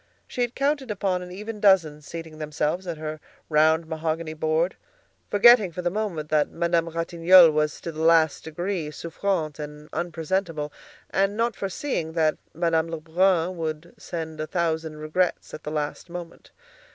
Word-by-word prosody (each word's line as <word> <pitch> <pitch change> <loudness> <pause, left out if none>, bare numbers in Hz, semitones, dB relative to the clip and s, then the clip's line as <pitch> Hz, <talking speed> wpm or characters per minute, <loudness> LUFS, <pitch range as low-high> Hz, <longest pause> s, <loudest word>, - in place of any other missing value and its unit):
She 250 - -4
had 240 0 -1
counted 275 -2 0
upon 195 -3 -1
an 180 - -8
even 210 +3 -6
dozen 175 -7 +4
seating 160 +1 -8
themselves 155 +4 -2
at 170 -2 -3
her 155 0 -5 0.3
round 160 +1 +4
mahogany 160 0 -3
board, 160 +3 0 0.5
forgetting 215 -2 +6
for 180 +2 -6
the 175 - +1
moment 180 -7 -3
that 155 -1 +2
Madame 170 0 0
Ratignolle 165 +1 +6
was 150 -1 0
to 170 - -4
the 155 0 -6
last 160 -2 +4
degree 175 0 -3
souffrante 165 -1 -2
and 150 0 -8
unpresentable, 165 -2 -2 0.4
and 195 +2 +1
not 230 -1 +1
foreseeing 190 - -3
that 160 -2 +1
Madame 165 -1 +1
Lebrun 170 +2 +1
would 160 +1 -4
send 160 -2 -5
a 155 - -3
thousand 160 -2 -1
regrets 155 +4 -1
at - - -7
the - - -4
last 150 +3 -3
moment. 175 -1 -9
165 Hz, 155 wpm, -25 LUFS, 155-185 Hz, 0.5 s, forgetting